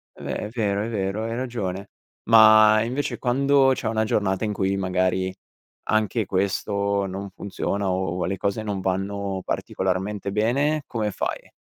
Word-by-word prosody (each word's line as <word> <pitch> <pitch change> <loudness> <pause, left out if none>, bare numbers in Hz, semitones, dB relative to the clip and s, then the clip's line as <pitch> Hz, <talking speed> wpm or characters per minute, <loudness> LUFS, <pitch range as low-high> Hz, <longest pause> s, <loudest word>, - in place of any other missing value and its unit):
È - - -14
ve - - -3
è 105 - -4
vero, 105 -4 -1
è 110 - -3
vero 100 0 -2
hai 115 +1 -3
ragione, 100 -6 -4 0.3
ma 110 -1 +7
invece 130 +5 -2
quando 135 +2 +3
c'è - - -4
una 110 0 +1
giornata 100 -2 0
in 105 -1 -1
cui 95 0 0
magari, 95 0 0 0.5
anche 110 0 0
questo 100 +1 0
non 95 +1 -5
funziona, 100 0 -3
o 90 -1 -1
le 95 - -1
cose 100 +2 -2
non 100 -2 -3
vanno 95 +1 -2
particolarmente 95 +2 -2
bene, 140 +9 +1
come 110 -3 -2
fai? - - -4
100 Hz, 155 wpm, -24 LUFS, 95-110 Hz, 0.5 s, ma